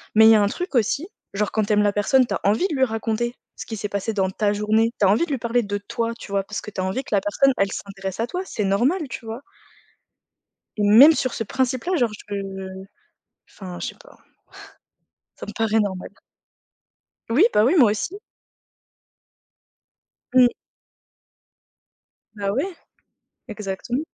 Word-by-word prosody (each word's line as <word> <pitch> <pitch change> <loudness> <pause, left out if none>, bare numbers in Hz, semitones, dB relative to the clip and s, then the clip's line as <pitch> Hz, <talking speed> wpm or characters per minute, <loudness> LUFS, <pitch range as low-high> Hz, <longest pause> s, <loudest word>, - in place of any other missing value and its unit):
mais 220 +1 +8
il - - +9
y - - +7
a 210 - +4
un 205 - +3
truc 350 - -5
aussi, 255 - +1 0.3
genre 205 0 -1
quand 220 - +1
tu 210 - -2
aimes 210 0 +4
la 205 -1 +2
personne, 250 +6 +3
tu - - -3
as - - -3
envie 215 - +2
de 310 - -3
lui 265 - +2
raconter 230 0 -1 0.2
ce - - -8
qui 220 - -6
s'est 205 0 -4
passé 200 +2 -2
dans 190 -2 0
ta 205 +2 0
journée, 215 +2 +1
tu 205 - +4
as 190 - +5
envie 220 +12 +3
de 315 - -8
lui 275 - 0
parler 235 0 0
de 205 0 -3
toi, 230 +3 -3
tu 200 - -10
vois? 195 -1 +1
Parce 210 +2 -5
que 210 - -9
tu 185 - -4
as - - -1
envie 190 +9 -2
que - - -1
la 195 - +2
personne 270 +7 +2
elle 195 0 +1
s'intéresse 195 -1 -6
à 230 - 0
toi, 360 +7 -3
c'est 210 - -3
normal. 260 - +1
Tu 240 - -7
vois? 225 +4 -6 1.4
Même 225 +10 +8
sur 255 -4 -1
ce 225 - -3
principe-là, 260 - -1
genre, 240 -6 +1 0.2
je 205 - -3 1.2
enfin 180 -3 -9
je - - -3
sais - - -8
pas. - - -18 1.2
Ça - - -7
me - - -7
paraît 225 -1 +1
normal. 190 -3 -2 1.2
Oui, 270 - +5
bah 210 - +4
oui 300 +9 +3
moi 235 -7 +6
aussi. 280 - -3 2.2
Mmh. 250 -1 +8 1.9
Bah, 200 -1 -2
ouais, 330 - -2 0.7
exactement. 210 +5 -4
220 Hz, 185 wpm, -22 LUFS, 205-255 Hz, 2.2 s, il